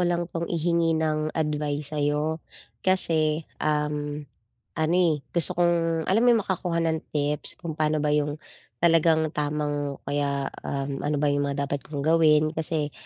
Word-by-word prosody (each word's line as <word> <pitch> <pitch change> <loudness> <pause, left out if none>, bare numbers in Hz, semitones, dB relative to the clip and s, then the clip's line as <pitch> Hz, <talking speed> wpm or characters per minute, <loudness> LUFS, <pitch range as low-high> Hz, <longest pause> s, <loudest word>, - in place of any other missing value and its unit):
lang 175 -1 +1
'tong 170 -1 -4
ihingi 170 -1 +1
ng 155 -1 0
advice 150 -1 -2
sa'yo. 150 +2 0 0.4
Kasi, 160 -4 +1 0.2
um, 150 -1 -1 0.5
ano, 160 +1 +1
eh, 160 -5 +2
gusto 170 -2 +1
kong 165 -2 +2
alam 195 +7 +2
mo 245 - +3
yung 225 - +2
makakuha 175 -3 -1
ng 160 -1 +1 0.2
tips? 145 0 -1
Kung 160 -2 -5
pano 155 -1 +1
ba 150 - +2
yung 150 0 +1 0.5
talagang 160 -2 +4
tamang 145 -1 -2
o - - -21
kaya, 140 -1 -1 0.2
um, 140 0 -3
ano 150 +1 -1
ba 145 0 +2
yung 145 0 0
mga 140 0 -1
dapat 140 0 -2
kong 145 -1 -6
gawin? 155 -1 +4
Kasi, 155 -2 -2
155 Hz, 160 wpm, -26 LUFS, 145-165 Hz, 0.5 s, talagang